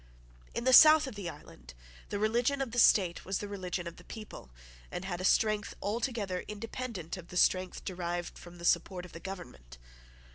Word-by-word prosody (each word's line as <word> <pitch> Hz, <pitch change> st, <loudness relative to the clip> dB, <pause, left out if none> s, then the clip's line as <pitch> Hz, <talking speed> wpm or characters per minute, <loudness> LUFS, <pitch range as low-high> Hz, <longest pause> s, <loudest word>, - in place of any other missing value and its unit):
In 235 Hz, -, -2 dB
the 260 Hz, +1 st, +3 dB
south 310 Hz, +2 st, +9 dB
of 265 Hz, -, -6 dB
the 200 Hz, -4 st, -5 dB
island 60 Hz, -, -13 dB, 0.3 s
the -, -, -2 dB
religion 235 Hz, +6 st, +1 dB
of 270 Hz, -4 st, -2 dB
the 245 Hz, -, 0 dB
state 185 Hz, -6 st, +4 dB
was 190 Hz, 0 st, -2 dB
the 205 Hz, -, -5 dB
religion 185 Hz, -3 st, -4 dB
of 170 Hz, 0 st, -7 dB
the -, -, -14 dB
people, 215 Hz, -, -10 dB, 0.4 s
and 180 Hz, -, -5 dB
had 180 Hz, -2 st, -4 dB
a -, -, -4 dB
strength 210 Hz, +2 st, +2 dB
altogether 210 Hz, -4 st, -2 dB
independent 210 Hz, -4 st, -6 dB
of 175 Hz, -2 st, -10 dB
the 180 Hz, -, -6 dB
strength 185 Hz, 0 st, +2 dB
derived 175 Hz, -1 st, -4 dB
from 175 Hz, 0 st, -12 dB
the 170 Hz, -, -8 dB
support 180 Hz, +1 st, +1 dB
of 180 Hz, -, -13 dB
the 165 Hz, -, -9 dB
government. 65 Hz, -, -9 dB
190 Hz, 190 wpm, -31 LUFS, 175-225 Hz, 0.4 s, south